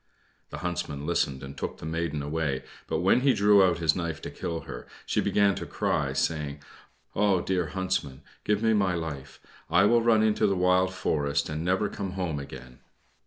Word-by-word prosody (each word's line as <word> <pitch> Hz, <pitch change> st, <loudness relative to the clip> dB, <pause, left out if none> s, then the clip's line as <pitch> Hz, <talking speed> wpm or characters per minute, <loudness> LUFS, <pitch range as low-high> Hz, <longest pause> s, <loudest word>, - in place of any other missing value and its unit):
The -, -, -7 dB
Huntsman 85 Hz, -5 st, -3 dB
listened 70 Hz, -5 st, 0 dB
and 70 Hz, 0 st, -8 dB
took 65 Hz, -, -4 dB
the -, -, -9 dB
maiden 80 Hz, -2 st, -2 dB
away, 75 Hz, -3 st, -2 dB, 0.2 s
but 80 Hz, -, -1 dB
when 95 Hz, +7 st, +4 dB
he 135 Hz, 0 st, +4 dB
drew 100 Hz, -1 st, +6 dB
out 90 Hz, -3 st, +3 dB
his 80 Hz, -2 st, +2 dB
knife 85 Hz, -3 st, -3 dB
to -, -, -5 dB
kill 85 Hz, -1 st, -4 dB
her, -, -, -9 dB, 0.2 s
she -, -, +1 dB
began 100 Hz, -1 st, +3 dB
to -, -, -6 dB
cry, -, -, 0 dB
saying, 75 Hz, -2 st, -2 dB, 0.5 s
"Ah, 100 Hz, -2 st, +3 dB
dear 90 Hz, -3 st, 0 dB
Huntsman, 90 Hz, -7 st, -3 dB, 0.2 s
give 105 Hz, +1 st, 0 dB
me 110 Hz, 0 st, +4 dB
my 95 Hz, -4 st, +2 dB
life! 80 Hz, -5 st, -6 dB, 0.3 s
I 85 Hz, +4 st, +5 dB
will 115 Hz, +3 st, +4 dB
run 115 Hz, -2 st, +4 dB
into 110 Hz, -1 st, +3 dB
the 100 Hz, -, +1 dB
wild 90 Hz, 0 st, +3 dB
forest, 70 Hz, -5 st, -1 dB
and 75 Hz, +1 st, -3 dB
never 95 Hz, +4 st, +1 dB
come 100 Hz, -2 st, -5 dB
home 90 Hz, -6 st, -2 dB
again." 65 Hz, -2 st, -10 dB
85 Hz, 190 wpm, -27 LUFS, 75-95 Hz, 0.5 s, drew